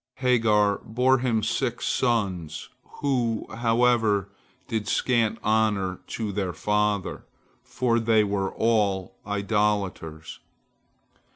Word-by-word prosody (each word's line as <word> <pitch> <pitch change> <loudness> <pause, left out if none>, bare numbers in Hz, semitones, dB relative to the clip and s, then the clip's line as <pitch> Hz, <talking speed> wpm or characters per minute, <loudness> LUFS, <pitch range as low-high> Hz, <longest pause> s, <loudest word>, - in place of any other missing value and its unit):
Hagar 110 -5 +2
bore 125 +3 +2
him 115 -4 0
six 120 +2 -1
sons, 95 - -1 0.3
who, 120 -6 0
however, 115 -4 +2 0.4
did 110 -3 -3
scant 115 -1 +1
honor 105 -4 +1
to 110 -3 -4
their 95 -3 -2
father, 105 +2 -1 0.4
for 120 -2 0
they 110 -1 +3
all 100 -1 0
were 100 - -8
idolaters. 100 -6 -1
110 Hz, 95 wpm, -25 LUFS, 100-115 Hz, 0.4 s, they